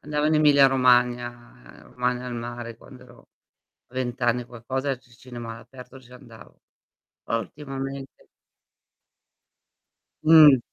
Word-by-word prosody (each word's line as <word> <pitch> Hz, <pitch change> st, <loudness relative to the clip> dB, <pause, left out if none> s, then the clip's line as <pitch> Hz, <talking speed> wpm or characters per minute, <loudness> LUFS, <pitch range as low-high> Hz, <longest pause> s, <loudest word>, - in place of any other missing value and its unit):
Andavo 150 Hz, 0 st, -2 dB
in 155 Hz, -, +2 dB
Emilia 145 Hz, -2 st, +6 dB
Romagna, 125 Hz, -2 st, +3 dB, 0.5 s
ehm, -, -, -18 dB
Romagna 125 Hz, 0 st, -2 dB
al 125 Hz, -, -5 dB
mare, 120 Hz, 0 st, -7 dB
quando -, -, -15 dB
ero -, -, -19 dB, 0.6 s
a 125 Hz, -, -22 dB
20 125 Hz, -1 st, -3 dB
anni 120 Hz, +1 st, +1 dB
e 120 Hz, -, -15 dB
qualcosa, 130 Hz, +3 st, -4 dB
ci 125 Hz, 0 st, -26 dB
cinema 120 Hz, -1 st, -9 dB
all'aperto 125 Hz, +3 st, -13 dB
ci 125 Hz, -1 st, -19 dB
andavo. 120 Hz, -3 st, -16 dB, 0.6 s
Poi 115 Hz, -, -1 dB
ultimamente 135 Hz, +3 st, -8 dB, 2.0 s
Mh. 155 Hz, -4 st, +8 dB
125 Hz, 130 wpm, -24 LUFS, 120-135 Hz, 2.0 s, Mh